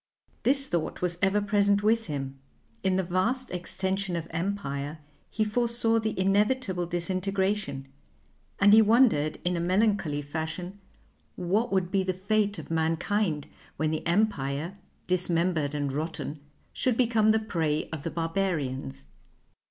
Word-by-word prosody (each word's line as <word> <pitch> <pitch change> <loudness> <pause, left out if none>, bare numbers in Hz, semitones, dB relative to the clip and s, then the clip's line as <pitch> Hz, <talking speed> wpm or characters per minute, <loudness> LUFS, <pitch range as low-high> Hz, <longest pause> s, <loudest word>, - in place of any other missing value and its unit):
This 275 +2 +2
thought 170 -6 -2
was 175 -1 0
ever 195 +1 +3
present 205 0 +2
with 225 0 +2
him; 135 -2 -4 0.4
in 190 -1 +1
the 190 - +1
vast 225 +9 0
extension 190 +1 -2
of 165 -1 -3
empire 160 -5 -3 0.3
he 220 - 0
foresaw 230 +1 +1
the 220 -3 -2
inevitable 195 -1 +1
disintegration, 190 -3 -1 0.7
and 205 +1 +6
he 220 - +9
wondered 215 - +4
in 180 0 +1
a - - -1
melancholy 185 -4 +1
fashion 160 +6 -5 0.6
what 200 +7 0
would 185 -2 +1
be 195 - +2
the 185 -1 -1
fate 205 +1 0
of 160 - -8
mankind 165 0 0 0.3
when 155 +1 0
the 155 - -2
Empire, 170 -4 0 0.3
dismembered 170 -4 +1
and 145 -2 -1
rotten, 155 0 -4 0.3
should 250 -3 0
become 225 -3 +3
the 220 - +5
prey 160 -8 -1
of 160 -3 -4
the 165 - -3
Barbarians. 155 - -2
185 Hz, 135 wpm, -28 LUFS, 160-210 Hz, 0.7 s, he